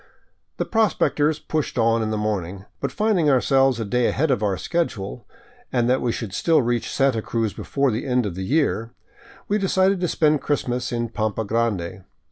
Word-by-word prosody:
The -, -, -1 dB
prospectors 160 Hz, -8 st, +1 dB
pushed 155 Hz, -2 st, -3 dB
on 115 Hz, 0 st, +3 dB
in 110 Hz, -, -1 dB
the 110 Hz, -, -1 dB
morning, 100 Hz, -3 st, -3 dB
but -, -, -2 dB
finding 210 Hz, -8 st, +2 dB
ourselves 135 Hz, -1 st, +3 dB
a 115 Hz, -, -2 dB
day 125 Hz, +3 st, +1 dB
ahead 150 Hz, +1 st, +1 dB
of 125 Hz, -, +1 dB
our 100 Hz, -3 st, 0 dB
schedule, 115 Hz, -, -3 dB, 0.4 s
and 120 Hz, -2 st, +1 dB
that 130 Hz, +1 st, +2 dB
we 120 Hz, -, 0 dB
could 110 Hz, -5 st, -5 dB
still 165 Hz, +9 st, +3 dB
reach 120 Hz, 0 st, -1 dB
Santa 135 Hz, -5 st, +2 dB
Cruz 115 Hz, -1 st, -2 dB
before 140 Hz, -2 st, 0 dB
the 110 Hz, +5 st, -3 dB
end 125 Hz, -2 st, +1 dB
of 100 Hz, -, -3 dB
the 95 Hz, -, -6 dB
year, 120 Hz, -1 st, 0 dB, 0.5 s
we 210 Hz, +1 st, +1 dB
decided 190 Hz, 0 st, +2 dB
to 180 Hz, -, 0 dB
spend 155 Hz, -3 st, +2 dB
Christmas 125 Hz, -4 st, -1 dB
in 120 Hz, -1 st, -2 dB
Pampa 110 Hz, -1 st, -2 dB
Grande. 100 Hz, -5 st, -1 dB
120 Hz, 185 wpm, -23 LUFS, 110-150 Hz, 0.5 s, on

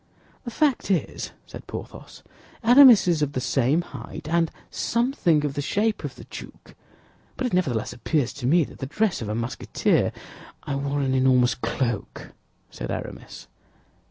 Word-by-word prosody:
"The -, -, -3 dB
fact 275 Hz, -1 st, +1 dB
is," 185 Hz, -4 st, -1 dB, 0.2 s
said -, -, -11 dB
Porthos, -, -, -9 dB, 0.4 s
"Aramis 245 Hz, -3 st, +8 dB
is 165 Hz, -3 st, +2 dB
of 145 Hz, -1 st, 0 dB
the 130 Hz, -, -1 dB
same 135 Hz, +6 st, +1 dB
height, 135 Hz, -3 st, -9 dB
and 165 Hz, 0 st, +2 dB, 0.2 s
something 235 Hz, -, +1 dB
of 145 Hz, -, -2 dB
the 145 Hz, -, -2 dB
shape 210 Hz, +9 st, 0 dB
of -, -, -5 dB
the -, -, -11 dB
duke; -, -, -11 dB, 0.6 s
but 260 Hz, -, -2 dB
it 250 Hz, -, -2 dB
nevertheless 130 Hz, -12 st, 0 dB
appears 130 Hz, 0 st, -1 dB
to 130 Hz, -4 st, -4 dB
me 165 Hz, +4 st, +4 dB
that -, -, -10 dB
the 135 Hz, -, -4 dB
dress 195 Hz, -, 0 dB
of 110 Hz, -, -4 dB
a 105 Hz, -, -2 dB
Musketeer—" 115 Hz, +2 st, 0 dB, 0.5 s
"I 145 Hz, -, -4 dB
wore 140 Hz, +1 st, -1 dB
an 135 Hz, -1 st, 0 dB
enormous 130 Hz, -1 st, +4 dB
cloak," 120 Hz, -4 st, -3 dB, 0.4 s
said -, -, -6 dB
Aramis. -, -, -7 dB
150 Hz, 160 wpm, -24 LUFS, 130-195 Hz, 0.6 s, Aramis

